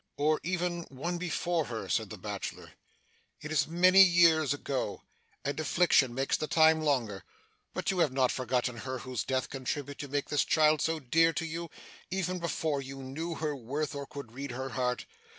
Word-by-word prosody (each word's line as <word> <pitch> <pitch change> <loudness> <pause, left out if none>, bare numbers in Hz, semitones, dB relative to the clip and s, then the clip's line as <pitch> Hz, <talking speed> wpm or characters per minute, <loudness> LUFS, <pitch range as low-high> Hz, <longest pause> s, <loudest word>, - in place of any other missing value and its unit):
'Or 150 +1 +2
even 175 0 -1
one 170 +7 -4
before 175 -2 -1
her,' 115 -6 -5
said - - 0
the - - -7
bachelor. - - -6 0.7
'It 155 - -7
is 145 -2 +2
many 185 +4 +6
years 170 -5 +6
ago, 140 -2 -3 0.4
and 140 +2 -2
affliction 155 -5 +3
makes 135 +1 +1
the 155 - -2
time 160 0 +5
longer, 120 - 0 0.5
but - - 0
you 190 - -2
have 160 -5 +3
not 130 -1 +2
forgotten 125 -1 -1
her 130 +2 -4
whose 130 -2 -4
death 130 -1 -1
contributed 140 +2 -4
to 145 - -5
make 140 +1 -2
this 145 -2 +2
child 155 -2 +3
so 160 0 0
dear 165 +5 +3
to 165 - -2
you, 165 +1 -5 0.4
even 185 -1 -2
before 160 -4 -1
you 135 0 -8
knew 160 +6 -4
her 155 -2 -2
worth 140 +5 -3
or 140 -1 -5
could 140 -5 -9
read 135 +3 -6
her 130 +2 -4
heart? 125 -1 -1
145 Hz, 185 wpm, -30 LUFS, 130-165 Hz, 0.7 s, many